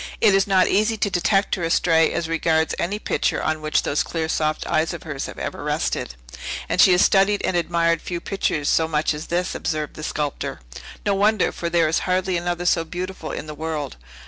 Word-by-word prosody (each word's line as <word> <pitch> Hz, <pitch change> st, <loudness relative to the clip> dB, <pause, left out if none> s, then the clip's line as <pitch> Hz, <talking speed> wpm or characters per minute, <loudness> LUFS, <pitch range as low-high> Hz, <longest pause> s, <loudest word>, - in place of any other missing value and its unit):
"It 215 Hz, -3 st, +5 dB
is 195 Hz, 0 st, +3 dB
not 190 Hz, -2 st, +4 dB
easy 215 Hz, +2 st, +2 dB
to 205 Hz, -1 st, 0 dB
detect 195 Hz, +3 st, +1 dB
her 180 Hz, -, -1 dB
astray 165 Hz, 0 st, +3 dB
as 165 Hz, -, -2 dB
regards 160 Hz, -1 st, +1 dB
any 200 Hz, +4 st, -1 dB
picture -, -, -1 dB
on 155 Hz, 0 st, -1 dB
which 155 Hz, 0 st, +1 dB
those 145 Hz, -, 0 dB
clear, 160 Hz, -2 st, -2 dB
soft 155 Hz, -1 st, -1 dB
eyes 160 Hz, +2 st, 0 dB
of -, -, -9 dB
hers 145 Hz, -4 st, -5 dB
have -, -, -9 dB
ever -, -, -5 dB
rested." -, -, -2 dB, 0.5 s
"And -, -, +2 dB
she 190 Hz, -, +7 dB
has 180 Hz, -, +5 dB
studied 200 Hz, +1 st, +3 dB
and 185 Hz, -, 0 dB
admired 170 Hz, -1 st, +1 dB
few 175 Hz, -1 st, -4 dB
pictures 165 Hz, -6 st, -2 dB
so 160 Hz, -, +3 dB
much 155 Hz, -1 st, 0 dB
as 150 Hz, +2 st, -7 dB
this," 180 Hz, +2 st, -1 dB
observed 155 Hz, -3 st, -3 dB
the -, -, -9 dB
sculptor. 150 Hz, -2 st, -3 dB, 0.5 s
"No 200 Hz, -, +2 dB
wonder; 205 Hz, +1 st, +2 dB
for 170 Hz, -, -4 dB
there 170 Hz, -1 st, +3 dB
is 155 Hz, -, +1 dB
hardly 185 Hz, 0 st, +1 dB
another 175 Hz, 0 st, -2 dB
so 170 Hz, -2 st, +3 dB
beautiful 180 Hz, 0 st, -6 dB
in -, -, -5 dB
the 155 Hz, -, -7 dB
world. 150 Hz, -2 st, -4 dB
170 Hz, 210 wpm, -22 LUFS, 155-185 Hz, 0.5 s, she